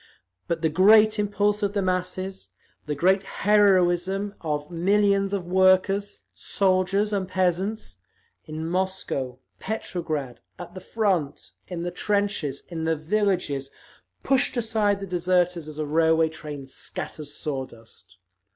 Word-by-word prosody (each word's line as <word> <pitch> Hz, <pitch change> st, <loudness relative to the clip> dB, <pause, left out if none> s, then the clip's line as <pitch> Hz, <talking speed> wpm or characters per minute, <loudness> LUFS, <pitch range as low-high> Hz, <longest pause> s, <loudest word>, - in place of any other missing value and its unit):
But 165 Hz, -1 st, -2 dB
the 160 Hz, -, +3 dB
great 210 Hz, +6 st, +5 dB
impulse 205 Hz, 0 st, +1 dB
of 205 Hz, -1 st, 0 dB
the 205 Hz, -, 0 dB
masses, 185 Hz, +1 st, -3 dB, 0.4 s
the 150 Hz, -, -1 dB
great 190 Hz, +6 st, +3 dB
heroism 195 Hz, -1 st, +2 dB
of 150 Hz, -1 st, -3 dB
millions 195 Hz, +3 st, +2 dB
of 195 Hz, -3 st, -2 dB
workers, 190 Hz, +2 st, +2 dB
soldiers 195 Hz, +2 st, +1 dB
and 195 Hz, -2 st, -1 dB
peasants, 185 Hz, -, -1 dB, 0.5 s
in 155 Hz, +1 st, -5 dB
Moscow, 175 Hz, -8 st, -2 dB, 0.2 s
Petrograd, 155 Hz, -, -4 dB, 0.2 s
at 175 Hz, 0 st, -9 dB
the 185 Hz, -, -8 dB
front, 185 Hz, -10 st, -1 dB, 0.2 s
in 175 Hz, -2 st, -5 dB
the 175 Hz, -, -3 dB
trenches, 200 Hz, -8 st, -1 dB
in 165 Hz, -2 st, -4 dB
the 160 Hz, 0 st, +2 dB
villages, 160 Hz, -5 st, -1 dB, 0.5 s
pushed 270 Hz, -1 st, +1 dB
aside 215 Hz, -3 st, +1 dB
the -, -, -3 dB
deserters 180 Hz, -2 st, 0 dB
as 155 Hz, -1 st, -9 dB
a 155 Hz, -, -2 dB
railway 160 Hz, +1 st, +3 dB
train 150 Hz, -3 st, -8 dB
scatters 145 Hz, +2 st, -7 dB
saw 135 Hz, -3 st, -4 dB
dust…. 100 Hz, -5 st, -16 dB
185 Hz, 130 wpm, -25 LUFS, 160-200 Hz, 0.5 s, great